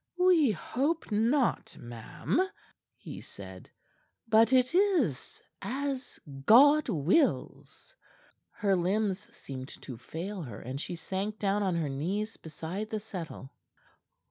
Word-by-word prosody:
"We 360 -6 +5
hope 270 - -1
not, 235 +5 +1
ma'am," 120 - -2 0.6
he - - -9
said. - - -11 0.6
"But 225 +2 +5
it 255 +2 +4
is 350 - +1 0.2
as 265 +4 -3 0.3
God 285 +5 +7
wills." 210 - 0 0.5
Her 200 -3 +1
limbs 195 +2 0
seemed 130 -1 -8 0.2
to 125 - -7
fail 180 - -6
her, 120 -9 -7
and 130 +4 -5
she 175 - -4
sank 195 +5 -3
down 205 0 +1
on 190 -3 +1
her 165 -3 0
knees 190 +11 -2
beside 165 +7 -6
the 220 - -2
settle. 175 -10 -7
205 Hz, 115 wpm, -30 LUFS, 165-255 Hz, 0.6 s, God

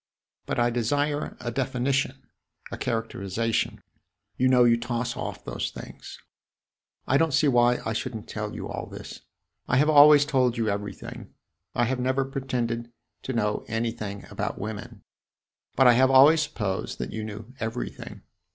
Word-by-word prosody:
But - - -2
I 120 0 +2
desire 145 +5 -1
a 120 - -3
definition, 130 +1 -1 0.5
a - - -5
characterization; 115 -1 -2 0.5
you 130 - +2
know 125 -1 +5
you 120 -1 +5
toss 120 0 -3
off - - -6
those - - -3
things. - - -10 0.9
I 135 - +3
don't 160 -4 +2
see 140 +2 +3
why 120 -2 +4
I 110 - -1
should 120 +2 -3
n't 110 - -7
tell - - -5
you - - -5
all - - -5
this - - -9 0.5
I 125 - +2
have 150 +3 +4
always 145 0 +8
told 130 -5 +1
you 115 -1 0
everything. 100 0 -6 0.4
I 120 - +2
have 130 +1 -1
never 130 +2 +1
pretended 120 -3 -3 0.3
to 130 - -4
know 105 -3 0
anything 115 -3 -3
about - - -3
women, 105 0 -7 0.7
but 135 - +5
I 125 - +8
have 130 +2 +4
always 140 +4 +7
supposed 105 -10 -3
that 60 +1 -5
you 110 - -4
knew 110 +3 -8
everything. 115 +2 -5
120 Hz, 160 wpm, -26 LUFS, 115-135 Hz, 0.9 s, always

